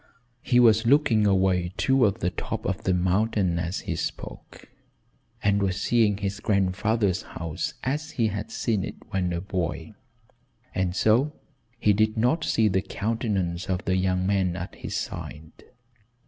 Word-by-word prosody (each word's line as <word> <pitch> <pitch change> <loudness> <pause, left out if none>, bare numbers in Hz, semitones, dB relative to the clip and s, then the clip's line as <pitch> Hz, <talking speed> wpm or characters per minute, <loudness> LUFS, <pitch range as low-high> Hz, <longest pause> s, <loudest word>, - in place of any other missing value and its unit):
He 125 -2 +3
was 115 -1 +5
looking 120 -6 +4
away 95 -2 +2
toward 125 -6 +2
the 90 - 0
top - - -5
of 95 -1 -3
the 95 - +2
mountain 95 -1 +1
as 85 +2 -3
he - - -3
spoke, - - -6 0.8
and 100 0 +2
was 95 -1 0
seeing 110 -2 +2
his 100 0 -3
grandfather's 100 0 +1
house 80 -2 -5
as 150 +5 -2
he 115 -3 +2
had 105 +1 -5
seen 110 -5 -1
it - - -5 0.2
when 90 -2 0
a 85 0 -2
boy, 90 -2 -3 0.8
and 95 -1 -1
so 120 +10 +3 0.4
he 105 -2 +3
did 110 +2 +1
not 125 +9 +2
see 110 -6 +2
the 95 -2 +1
countenance 100 -6 -2
of 90 -1 -1
the 95 - +1
young 95 0 +1
man 95 -3 +1
at 90 -1 -6
his - - -6
side. 80 +2 -6
100 Hz, 155 wpm, -26 LUFS, 90-110 Hz, 0.8 s, was